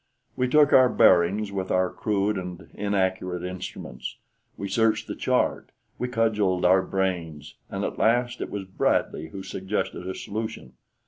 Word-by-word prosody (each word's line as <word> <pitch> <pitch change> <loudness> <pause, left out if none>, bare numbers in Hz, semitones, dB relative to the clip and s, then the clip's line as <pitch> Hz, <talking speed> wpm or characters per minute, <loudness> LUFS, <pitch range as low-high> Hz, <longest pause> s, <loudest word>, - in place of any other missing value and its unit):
We 125 - +1
took 145 +2 +5
our 130 -1 +7
bearings 95 +3 +4
with 95 -1 -3
our 90 0 +2
crude 105 0 0
and 90 -2 -7
inaccurate 95 -3 -1
instruments; 90 -9 -6 0.4
we 100 - -4
searched 110 +3 +2
the - - -5
chart; - - 0 0.3
we 125 - -1
cudgeled 105 -7 +1
our 95 +1 +6
brains; 85 -6 -3 0.2
and - - -3
at - - -4
last 120 +2 +2
it - - -3
was 100 -1 -4
Bradley 95 -4 0
who 95 +4 -8
suggested 95 -2 -3
a 95 - -3
solution. 105 - -5
95 Hz, 150 wpm, -26 LUFS, 90-110 Hz, 0.4 s, our